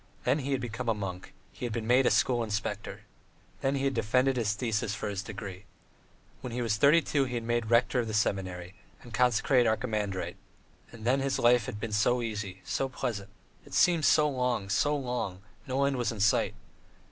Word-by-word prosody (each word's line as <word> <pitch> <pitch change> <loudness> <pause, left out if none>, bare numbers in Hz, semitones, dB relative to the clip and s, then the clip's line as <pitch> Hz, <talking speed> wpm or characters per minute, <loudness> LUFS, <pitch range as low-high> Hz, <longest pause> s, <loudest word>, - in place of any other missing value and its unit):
Then 130 +5 +2
he 140 0 -3
had 135 -2 0
become 120 0 -4
a 115 - +2
monk; 95 -3 -6 0.2
he - - -12
had 120 - -2
been 110 0 -3
made 125 +3 +4
a - - +6
school 120 -2 +2
inspector. 105 -2 -4 0.6
Then 135 +1 +1
he 135 - -1
had 135 0 +1
defended 125 +4 +2
his 110 -4 +1
thesis 105 -3 -1
for 105 - -4
his 100 -1 -3
degree. 100 -2 -8 0.8
When 125 - -6
he 120 +1 -2
was 110 -3 +1
thirty 150 +7 +5
two 140 -2 +1
he 125 -1 -4
had 115 - -2
been - - -8
made 120 -2 0
rector 120 +2 +3
of 120 - -1
the 110 - -3
seminary, 95 -3 -1 0.3
and 120 - -12
consecrated 125 +1 +3
archimandrite: 105 -4 -2 0.5
and 115 -1 -10
then 130 +3 +3
his 135 0 0
life 120 -1 +4
had 105 - -5
been 110 0 -4
so 120 +3 +2
easy, 105 -4 -5
so 115 +9 -1
pleasant; 115 -6 -4 0.3
it - - -9
seemed 170 -4 +4
so 150 -1 +5
long, 125 -7 -1
so 145 +9 +2
long, 120 -8 -3 0.2
no 135 +1 +1
end 140 -1 0
was 120 -1 0
in 110 - -7
sight. 100 0 +2
120 Hz, 205 wpm, -29 LUFS, 105-130 Hz, 0.8 s, a